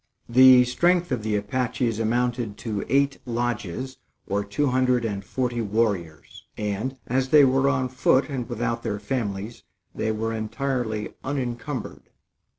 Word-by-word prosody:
The 130 +1 +8
strength 175 +7 +1
of 125 -3 0
the 105 0 -1
Apaches 115 +2 -1
amounted 120 -1 -1
to 105 -4 -3
eight 140 +1 +2
lodges, 120 0 -3 0.3
or 100 +1 -1
two 100 +9 -1
hundred 125 -1 +2
and 100 -3 -3
forty 120 +2 -2
warriors; 100 -8 -2
and, 105 +6 -3
as 130 +1 0
they 150 -1 +7
were 135 +1 +3
on 130 -2 +1
foot 130 +1 +2
and 130 -5 -4
without 115 0 -2
their 105 -3 -2
families, 105 -1 -4 0.3
they 110 - -1
were 110 +1 -2
entirely 110 0 -2
unencumbered. 130 0 -4
120 Hz, 140 wpm, -25 LUFS, 110-130 Hz, 0.3 s, The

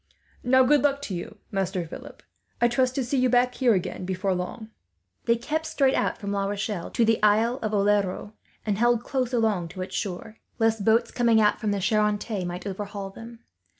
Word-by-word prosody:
"Now, 260 +1 +5
good 290 +2 +4
luck 280 0 +1
to 205 - -4
you, 180 +4 -6
Master 190 -2 -1
Philip. 160 - -11 0.4
I 240 - +4
trust 255 +1 +1
to 270 - 0
see 260 +2 0
you 255 0 +3
back 250 +1 +3
here 245 -4 +3
again, 185 0 -3
before 190 +1 -1
long." 215 +5 -5 0.5
They 235 - +4
kept 310 +7 -3
straight 270 -2 +2
out - - 0
from 200 -2 -5
La 200 -1 0
Rochelle 200 -2 -3
to 235 - +2
the 225 -1 +2
Isle 220 +4 +3
of 215 - -2
Oleron, 205 0 +1 0.3
and 205 -2 -1
held 240 0 +3
along 230 -8 +1
close - - -14
to 185 - -5
its 185 - -7
shore, 205 +3 -4 0.2
lest 225 -2 +1
boats 225 +1 +3
coming 235 -2 +3
out 210 -1 +3
from 215 - 0
the 205 -1 0
Charente 210 0 0
might 175 +2 -5
overhaul 200 0 -5
them. 230 +3 -11
220 Hz, 200 wpm, -25 LUFS, 200-240 Hz, 0.5 s, Now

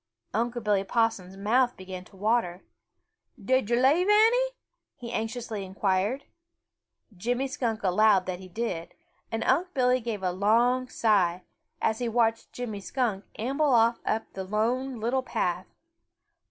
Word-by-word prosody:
Unc' 235 +2 -1
Billy 205 -2 +2
Possum's 195 -3 -1
mouth 245 +5 +2
began 185 -1 -8
to - - -19
water. 205 -3 0 0.8
"Did 255 +2 +1
yo' 240 - +3
leave 285 +9 +3
any?" 450 +4 +5 0.5
he 235 -1 -8
anxiously 225 -2 -3
inquired. 195 +6 -1 0.9
Jimmy 245 +8 -1
Skunk 235 -5 -3
allowed 195 0 +4
that 185 -1 -4
he 185 - -10
did, 185 -4 -4 0.4
and 225 - -2
Unc' 345 +7 +1
Billy 255 -1 +3
gave 220 -5 -4
a 180 - +1
long 235 +7 +2
sigh, 185 -5 +2 0.4
as 220 0 +1
he 240 -1 -1
watched 225 -1 +1
Jimmy 230 -5 -5
Skunk 205 0 -2
amble 270 +4 +1
off 230 +1 +3
up 220 +1 0
the 190 - -5
Lone 235 +6 -1
Little 240 +4 0
Path. 255 - -2
225 Hz, 140 wpm, -27 LUFS, 195-250 Hz, 0.9 s, any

